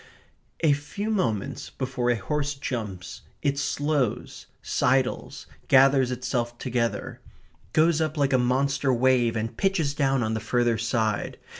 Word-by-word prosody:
A 155 -3 +4
few 175 +10 -4
moments 125 - -2
before 130 -2 -2
a 120 - +3
horse 145 +5 -2
jumps 105 -9 -5 0.2
it 140 -1 +1
slows, 145 -4 -1 0.2
sidles, 130 0 0 0.2
gathers 135 -1 +5
itself 120 -1 -2
together, 120 -2 -2 0.5
goes 160 +2 +3
up 155 0 -1
like 140 -2 +1
a 130 - +4
monster 135 +2 +1
wave, 125 -2 +2
and 110 +1 -3
pitches 175 -7 0
down 135 -3 +1
on 110 0 -1
the 110 - -1
further 120 0 +1
side. 110 -2 -1
130 Hz, 135 wpm, -25 LUFS, 120-145 Hz, 0.5 s, gathers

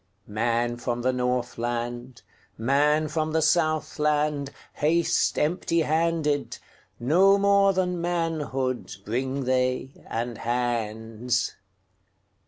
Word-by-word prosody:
Man 120 +2 0
from 120 0 -3
the 130 +1 +2
Northland, 120 0 -3 0.3
Man 145 +6 +2
from 155 +1 -2
the 160 - +2
Southland, 150 -3 +1 0.2
Haste 165 +3 +1
empty 165 +1 +1
handed; 160 -2 0 0.4
No 185 +10 +5
more 200 0 +4
than 180 -1 0
manhoodBring 135 - -2
they, 130 +1 0 0.2
and 115 0 -3
hands. 115 0 -1
135 Hz, 85 wpm, -26 LUFS, 120-160 Hz, 0.4 s, No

